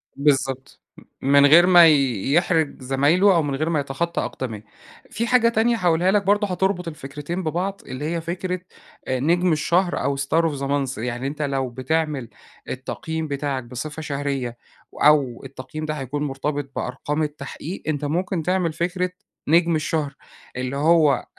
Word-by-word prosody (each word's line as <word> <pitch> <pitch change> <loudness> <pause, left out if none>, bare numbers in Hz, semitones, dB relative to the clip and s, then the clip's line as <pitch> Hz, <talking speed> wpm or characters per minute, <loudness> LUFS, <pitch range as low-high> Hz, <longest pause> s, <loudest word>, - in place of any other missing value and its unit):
بالضبط 135 -2 0 0.2
م - - -13 0.3
من 140 0 +6
غير 165 +5 +7
ما 175 -2 +8
يحرج 145 - +2
زمايله 150 +9 +3
أو 165 - +4
من 140 -2 -2
غير 155 +4 -1
ما 160 -3 +1
يتخطى 145 +5 -2
أقدميه، 110 -5 -5 0.4
في 230 +1 -2
حاجة 235 -1 +4
تانية 230 +1 +2
هاقولها 180 -1 +2
لَك 205 -1 +2
برضو 205 +2 +2
هتربط 180 -1 -1
الفكرتين 150 +4 -5
ببعض 180 +5 -2
اللي 130 +3 -5
هي 165 +1 -2
فكرة 180 +2 -3 0.5
آآ 130 -1 0
نجم 175 +6 +2
الشهر 175 +4 +1
أو 140 +1 0
Star 140 +4 +1
Of 140 - -6
The - - -4
Month، 135 -2 -1
يعني 120 +3 -3
أنتَ 150 +2 -5
لو 135 -3 -1
بتعمل 140 0 -2 0.4
التقييم 160 +5 -4
بتاعك 140 -2 -2
بصفة 140 +6 -6
شهرية، 140 -5 -3 0.5
أو 140 -5 +4
التقييم 135 +3 -7
ده 155 - -2
هيكون 145 0 -4
مرتبط 145 +1 -3
بأرقام 150 +5 -2
التحقيق، 150 +4 -6
أنتَ 150 -1 -1
ممكن 175 +3 -1
تعمل 180 -2 0
فكرة 180 +2 -1 0.4
نجم 170 +1 +4
الشهر، 155 -2 -2 0.4
اللي 130 +1 -3
هو 155 -1 +4
أ 125 - -3
150 Hz, 160 wpm, -23 LUFS, 135-170 Hz, 0.5 s, ما